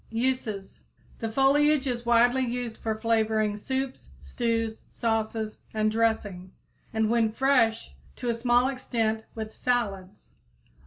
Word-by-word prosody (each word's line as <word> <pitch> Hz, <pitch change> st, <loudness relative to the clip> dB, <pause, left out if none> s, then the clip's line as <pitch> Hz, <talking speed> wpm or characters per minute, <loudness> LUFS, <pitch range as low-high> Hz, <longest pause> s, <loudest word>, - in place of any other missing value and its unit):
Uses. 225 Hz, -4 st, -2 dB, 0.4 s
The 225 Hz, -2 st, -3 dB
foliage 285 Hz, +3 st, +4 dB
is 240 Hz, -2 st, -3 dB
widely 240 Hz, +2 st, +4 dB
used 240 Hz, -2 st, -3 dB
for 220 Hz, -1 st, -2 dB
flavoring 220 Hz, -2 st, +1 dB
soups, 265 Hz, +4 st, -4 dB
stews, 230 Hz, -2 st, -2 dB
sauces, 220 Hz, -1 st, -2 dB, 0.2 s
and 215 Hz, 0 st, +2 dB
dressings, 210 Hz, -5 st, -1 dB, 0.3 s
and, 220 Hz, 0 st, +1 dB
when 225 Hz, -1 st, +2 dB
fresh, 230 Hz, -2 st, +2 dB, 0.2 s
to 245 Hz, -, -6 dB
a -, -, +2 dB
small 240 Hz, +2 st, +3 dB
extent 225 Hz, -4 st, -1 dB
with 220 Hz, -1 st, -5 dB
salads. 205 Hz, -6 st, -2 dB
230 Hz, 120 wpm, -27 LUFS, 220-245 Hz, 0.4 s, foliage